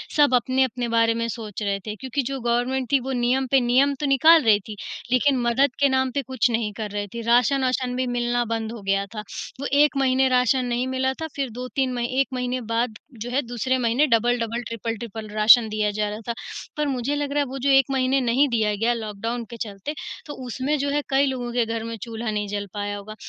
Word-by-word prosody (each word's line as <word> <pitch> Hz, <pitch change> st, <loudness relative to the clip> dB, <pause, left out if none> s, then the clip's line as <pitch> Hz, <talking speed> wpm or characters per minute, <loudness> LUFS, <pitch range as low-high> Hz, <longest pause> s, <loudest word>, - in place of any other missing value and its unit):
सब 290 Hz, -3 st, +4 dB
अपने-अपने 250 Hz, 0 st, +1 dB
बारे 230 Hz, 0 st, +3 dB
में 230 Hz, 0 st, -2 dB
सोच 220 Hz, -3 st, -6 dB
रहे 200 Hz, -1 st, -1 dB
थे 210 Hz, -, -4 dB
क्योंकि 260 Hz, +4 st, -3 dB
जो 270 Hz, -, -3 dB
गवर्नमेंट 245 Hz, +2 st, 0 dB
थी, 275 Hz, -, +5 dB
वो 265 Hz, +2 st, -5 dB
नियम 255 Hz, +1 st, +1 dB
पे 270 Hz, -, +6 dB
नियम 260 Hz, +3 st, +3 dB
तो 295 Hz, -, -1 dB
निकाल 315 Hz, +4 st, +6 dB
रही 215 Hz, -2 st, +5 dB
थी, 215 Hz, -, -6 dB, 0.4 s
लेकिन 265 Hz, +1 st, +3 dB
मदद 250 Hz, +3 st, +2 dB
के 280 Hz, -, +4 dB
नाम 260 Hz, -1 st, +1 dB
पे 280 Hz, -, -1 dB
कुछ 260 Hz, -2 st, 0 dB
नहीं 225 Hz, -2 st, -1 dB
कर 210 Hz, -1 st, -5 dB
रही 205 Hz, 0 st, -3 dB
थी। 235 Hz, -, -4 dB
राशन-वाशन 250 Hz, +2 st, +2 dB
भी 255 Hz, 0 st, 0 dB
मिलना 240 Hz, 0 st, 0 dB
बंद 225 Hz, -1 st, -3 dB
हो 230 Hz, -3 st, -8 dB
गया 195 Hz, 0 st, 0 dB
था। -, -, -4 dB, 0.4 s
वो 280 Hz, -, -4 dB
1 295 Hz, +1 st, +4 dB
महीने 265 Hz, 0 st, +3 dB
राशन 255 Hz, 0 st, +2 dB
नहीं 245 Hz, +1 st, -1 dB
मिला 260 Hz, 0 st, 0 dB
था, 320 Hz, -, -2 dB
फिर 275 Hz, -3 st, -2 dB
2-3 255 Hz, +2 st, -2 dB
मही 240 Hz, -1 st, -1 dB
1 275 Hz, -, +3 dB
महीने 250 Hz, 0 st, -2 dB
बाद 230 Hz, 0 st, -2 dB, 0.2 s
जो 245 Hz, -, -4 dB
है 265 Hz, +3 st, +1 dB
दूसरे 245 Hz, +1 st, -1 dB
महीने 250 Hz, +4 st, +2 dB
डबल-डबल, 235 Hz, -1 st, +1 dB
ट्रिपल-ट्रिपल 225 Hz, -1 st, -5 dB
राशन 215 Hz, +2 st, +6 dB
दिया 210 Hz, 0 st, 0 dB
जा 210 Hz, 0 st, -1 dB
रहा 210 Hz, +1 st, -5 dB
था। 235 Hz, -, -1 dB, 0.4 s
पर 300 Hz, -1 st, 0 dB
मुझे 270 Hz, +1 st, -1 dB
लग 290 Hz, -1 st, -2 dB
रहा 290 Hz, -, +1 dB
है -, -, -4 dB
वो 270 Hz, -, -5 dB
जो 275 Hz, +2 st, 0 dB
1 270 Hz, -1 st, +6 dB
महीने 265 Hz, 0 st, +2 dB
नहीं 255 Hz, +4 st, +3 dB
दिया 215 Hz, -3 st, +1 dB
गया 230 Hz, +4 st, +1 dB
लॉकडाउन 230 Hz, +2 st, -4 dB
के 235 Hz, -, -8 dB
चलते, 210 Hz, +6 st, -5 dB, 0.3 s
तो 295 Hz, -, -7 dB
उसमें 265 Hz, +5 st, -1 dB
जो 285 Hz, -, 0 dB
है 290 Hz, +1 st, +1 dB
कई 275 Hz, +1 st, +3 dB
लोगों 250 Hz, -3 st, -3 dB
के 240 Hz, -1 st, +2 dB
घर 225 Hz, 0 st, -3 dB
में 230 Hz, 0 st, -5 dB
चूल्हा 225 Hz, 0 st, -4 dB
नहीं 210 Hz, -1 st, -2 dB
जल 205 Hz, 0 st, -4 dB
पाया 205 Hz, 0 st, -3 dB
होगा। 215 Hz, +2 st, -9 dB
245 Hz, 230 wpm, -23 LUFS, 225-265 Hz, 0.4 s, पे